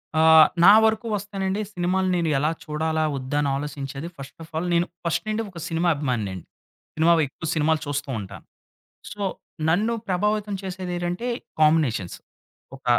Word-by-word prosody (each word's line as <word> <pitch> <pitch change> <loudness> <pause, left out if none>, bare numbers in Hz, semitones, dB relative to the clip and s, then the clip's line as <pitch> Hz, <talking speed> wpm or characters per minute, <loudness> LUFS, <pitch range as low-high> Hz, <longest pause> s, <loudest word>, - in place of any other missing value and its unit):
ఆ! 155 - +4 0.4
నా 200 +3 +10
వరకు 220 +1 +1
వస్తేనండి 195 0 -3
సినిమాలు 185 +1 0
నేను 170 -2 0
ఎలా 150 +3 +1
చూడాలా 160 0 -1
వద్దా 130 +2 -3
అని 145 - 0
ఆలోచించేది 140 +1 -5
ఫస్ట్ 140 +3 -11
ఆఫ్ 160 - -15
ఆల్ 175 +3 -1
నేను 170 0 +3 0.2
ఫస్ట్ 170 - 0
నుండి 215 +1 0
ఒక 175 - -9
సినిమా 170 +1 +1
అభిమానినే 125 -9 -2
అండి. 90 - -9 0.5
సినిమా 165 +2 +5
ఎక్కువ 160 +4 -8
సినిమాలు 155 0 +2
చూస్తూ 145 0 -3
ఉంటాను. 100 -2 -9 0.7
సో 205 - -8 0.5
నన్ను 210 +8 +2
ప్రభావితం 210 +2 0
చేసేది 185 -1 -5
ఏటంటే 175 +7 -3 0.3
కాంబినేషన్స్. 150 - +2 0.6
ఒక 135 - -18
165 Hz, 155 wpm, -24 LUFS, 145-190 Hz, 0.7 s, నా